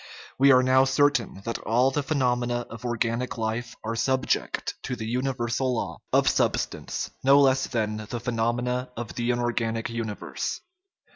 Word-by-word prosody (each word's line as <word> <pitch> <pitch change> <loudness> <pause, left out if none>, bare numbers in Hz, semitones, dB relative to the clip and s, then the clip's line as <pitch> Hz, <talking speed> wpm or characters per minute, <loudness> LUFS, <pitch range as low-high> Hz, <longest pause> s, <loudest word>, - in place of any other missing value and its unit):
We 140 +1 +7
are 130 0 +6
now 130 +1 +5
certain 135 -7 +1
that 115 - -2
all 125 +4 +2
the 145 - 0
phenomena 125 -4 0
of 115 0 -9
organic 120 +1 -1
life 115 +1 -3
are 115 +1 -2
subject 130 +1 0
to 125 - -3
the 110 - -5
universal 125 +1 -1
law - - -4
of - - +3
substance - - 0
no 135 +1 +6
less 135 -1 +4
than 110 -3 -1
the 120 - -3
phenomena 120 +2 -1
of 115 -6 -5
the 120 +5 -2
inorganic 120 -2 -1
universe. 115 -3 -4
120 Hz, 150 wpm, -26 LUFS, 115-130 Hz, -, We